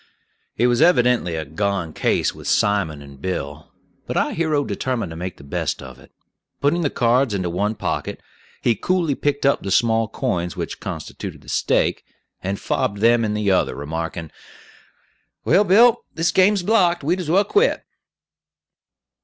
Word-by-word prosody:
It 120 Hz, -, +3 dB
was 120 Hz, +2 st, +2 dB
evidently 125 Hz, -, +3 dB
a 80 Hz, -1 st, -3 dB
"gone 90 Hz, +1 st, -2 dB
case" -, -, 0 dB
with -, -, -10 dB
Simon 90 Hz, -8 st, +1 dB
and 70 Hz, -1 st, -14 dB
Bill; 80 Hz, -4 st, -5 dB, 0.4 s
but -, -, -2 dB
our -, -, +1 dB
hero 155 Hz, -3 st, 0 dB
determined 125 Hz, -9 st, -3 dB
to -, -, -7 dB
make 90 Hz, +2 st, -6 dB
the -, -, -14 dB
best 70 Hz, -, -3 dB
of 65 Hz, -1 st, -11 dB
it. -, -, -18 dB, 0.5 s
Putting 150 Hz, +5 st, +1 dB
the 150 Hz, -, +1 dB
cards 120 Hz, -2 st, +2 dB
into 90 Hz, -3 st, -2 dB
one 105 Hz, +5 st, -1 dB
pocket, -, -, -3 dB, 0.4 s
he 120 Hz, -, +3 dB
coolly 170 Hz, -, 0 dB
picked 145 Hz, +1 st, -1 dB
up 140 Hz, -, +3 dB
the 100 Hz, -, -5 dB
small 115 Hz, +2 st, +2 dB
coins 90 Hz, -4 st, -2 dB
which -, -, -5 dB
constituted -, -, -7 dB
the -, -, -14 dB
stake, -, -, +1 dB, 0.4 s
and 95 Hz, +1 st, -3 dB
fobbed 100 Hz, -, -1 dB
them 115 Hz, +2 st, +4 dB
in 105 Hz, -1 st, -1 dB
the 105 Hz, -2 st, +1 dB
other, 95 Hz, -, +1 dB
remarking, 80 Hz, +2 st, -5 dB, 1.1 s
"Well, 165 Hz, -, +4 dB
Bill, 230 Hz, +5 st, +5 dB
this 165 Hz, +1 st, +1 dB
game's 195 Hz, 0 st, +3 dB
blocked; 180 Hz, -5 st, +2 dB
we'd 175 Hz, +6 st, 0 dB
as 175 Hz, -4 st, -4 dB
well 190 Hz, +5 st, +4 dB
quit." 420 Hz, -, +1 dB
115 Hz, 165 wpm, -21 LUFS, -, 1.1 s, Bill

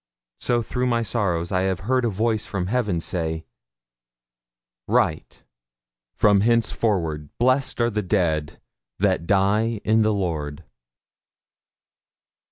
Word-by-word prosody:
So, 120 Hz, -1 st, 0 dB
through 125 Hz, +3 st, -2 dB
my 120 Hz, -1 st, +1 dB
sorrows, 95 Hz, -5 st, -1 dB
I 90 Hz, -, +2 dB
have 95 Hz, -2 st, -3 dB
heard 125 Hz, +4 st, +1 dB
a -, -, +2 dB
voice 110 Hz, +1 st, 0 dB
from 95 Hz, -3 st, -2 dB
heaven 105 Hz, -4 st, 0 dB
say, 80 Hz, -2 st, -3 dB, 1.4 s
'Write, -, -, 0 dB, 0.7 s
from 100 Hz, -1 st, +4 dB
hencefore 100 Hz, -9 st, 0 dB
blessed 130 Hz, +2 st, +1 dB
are 120 Hz, 0 st, +2 dB
the 105 Hz, 0 st, -1 dB
dead 85 Hz, -6 st, -1 dB, 0.4 s
that 85 Hz, -, +1 dB
die 105 Hz, +3 st, +2 dB
in 110 Hz, +1 st, +3 dB
the 110 Hz, 0 st, +3 dB
Lord!' 80 Hz, -7 st, -3 dB
105 Hz, 115 wpm, -23 LUFS, 85-115 Hz, 1.4 s, from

